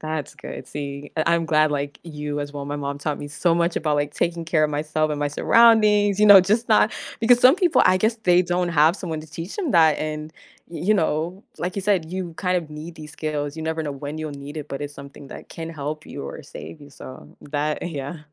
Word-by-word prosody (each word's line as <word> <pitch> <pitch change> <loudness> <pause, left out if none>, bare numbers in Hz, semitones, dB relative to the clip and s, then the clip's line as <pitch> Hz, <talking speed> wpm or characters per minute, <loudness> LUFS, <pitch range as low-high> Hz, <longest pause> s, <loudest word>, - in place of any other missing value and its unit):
That's 155 -2 -4
good, - - -8
see, 140 0 -6
I 165 +2 +2
I'm 170 0 0
glad 155 -1 +3
like, 145 0 -3
you 150 -2 -5
as 145 0 -5
well, 145 -1 -6
my 145 +1 -4
mom 140 0 -4
taught 150 0 -3
me 145 - -6
so 160 +4 +1
much 170 0 +1
about, 150 -1 0
like, 145 0 -2
taking 170 -1 -1
care 160 -1 +1
of 155 - +2
myself 155 +1 -1
and 150 - -2
my 145 - 0
surroundings, 210 +3 +4
you 210 - +6
know, 200 -2 +10
just 215 +6 0
not 215 -1 +4 0.3
because 240 +1 +5
some 255 +6 +7
people, 360 -4 +3
I 185 - +5
guess 220 +5 +1
they 180 -2 +4
don't 175 0 -1
have 160 0 +4
someone 165 -6 -5
to 155 - -12
teach 165 +5 -7
them 365 -8 -2
that, 160 -3 +5
and, 155 0 -4 0.4
y 170 - -8
you 215 +3 +4
know, 170 +1 -1 0.2
like 180 +1 -3
you 195 - -3
said, 185 -5 0
you 180 -3 -4
kind 180 +1 0
of 165 -3 -4
need 155 +3 -8
these 155 -1 -10
skills, 150 -2 -4
you 160 - -5
never 160 0 -2
know 150 - -3
when 145 +2 -6
you'll 155 -1 -4
need 140 +1 -9
it, 150 -1 -6
but 140 - -5
it's 145 0 -6
something 140 0 -11
that - - -10
can 165 -1 -7
help 155 0 -6
you 140 - -7
or - - -7
save 155 +2 -10
you, 145 0 -14
so, 130 -1 -12
that, 150 +1 -1
yeah. 150 -1 -5
155 Hz, 245 wpm, -23 LUFS, 145-180 Hz, 0.4 s, know